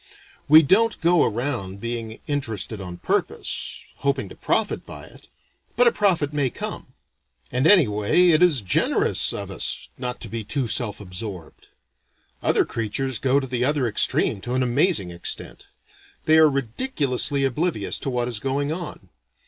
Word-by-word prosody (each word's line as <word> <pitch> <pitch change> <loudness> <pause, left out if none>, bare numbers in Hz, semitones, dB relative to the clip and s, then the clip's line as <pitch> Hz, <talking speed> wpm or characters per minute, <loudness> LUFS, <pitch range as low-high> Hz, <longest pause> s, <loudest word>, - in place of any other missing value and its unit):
We 155 +2 +8
don't 220 +9 +3
go 170 0 +4
around 110 -5 -2
being 115 -1 -5
interested 115 -7 -3
on 90 -2 -7
purpose, - - -3 0.2
hoping 140 -8 -1
to - - -12
profit - - -1
by - - -10
it, - - -16 0.5
but 245 - +4
a 235 - +6
profit 170 -10 +1
may 145 -3 +1
come. - - -7 0.6
And 130 +5 +2
anyway 160 - +4
it 160 0 +4
is 165 -9 +4
generous 95 - +1
of - - -5
us - - -3
not 125 -1 -3
to 115 - -6
be 115 +1 -5
too 130 +4 -2
self 120 -5 -2
absorbed. 90 -2 -7 0.7
Other - - +2
creatures 115 +3 -3
go 135 +1 +2
to 135 - -4
the 125 -1 -2
other 140 0 +1
extreme 100 -2 +1
to 125 +4 -3
an 130 - +2
amazing 125 - +1
extent. 85 0 -5 0.6
They 160 0 +5
are 155 -1 +7
ridiculously 140 - 0
oblivious 135 - -1
to - - -3
what 120 -2 -1
is 120 -4 -3
going 140 +4 -1
on. 170 -1 -6
130 Hz, 155 wpm, -23 LUFS, 110-150 Hz, 0.7 s, We